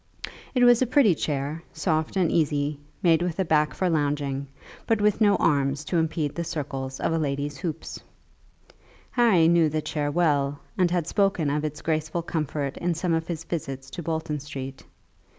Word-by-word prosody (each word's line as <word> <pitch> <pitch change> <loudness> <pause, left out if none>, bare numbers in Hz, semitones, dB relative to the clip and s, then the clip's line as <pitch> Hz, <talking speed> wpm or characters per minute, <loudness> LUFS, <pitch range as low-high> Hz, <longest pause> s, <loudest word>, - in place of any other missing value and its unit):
It 250 - +4
was 245 -1 +6
a 255 - +3
pretty 240 -6 +5
chair, 145 +1 -2
soft 160 -1 -1
and 180 -4 +2
easy, 145 -2 +1 0.2
made 165 -2 +4
with 175 -2 -2
a 190 - +1
back 150 -2 +2
for 185 - 0
lounging, 145 -3 -1 0.4
but 225 -2 +2
with 210 +1 +2
no 205 -2 +5
arms 140 -1 +1
to 175 - -1
impede 160 -2 -1
the 170 - -3
circles 135 -5 -4
of 165 - 0
a 165 - +1
lady's 140 -1 -2
hoop. 165 -4 -4 1.3
Harry 215 -10 +4
knew 170 -2 +4
the 155 +1 -1
chair 145 -2 -2
well 145 -3 +1 0.2
and 180 -2 +3
had 175 -2 0
spoken 190 -6 +1
of 150 +1 -1
its 150 -1 -4
graceful 155 +1 -1
comfort 150 -4 -3
in 175 -1 -1
some 170 +1 0
of 165 0 -1
his 165 -2 -4
visits 135 -5 -5
to - - -5
Bolton 160 -2 -2
Street. 135 -2 -7
155 Hz, 180 wpm, -25 LUFS, 145-175 Hz, 1.3 s, was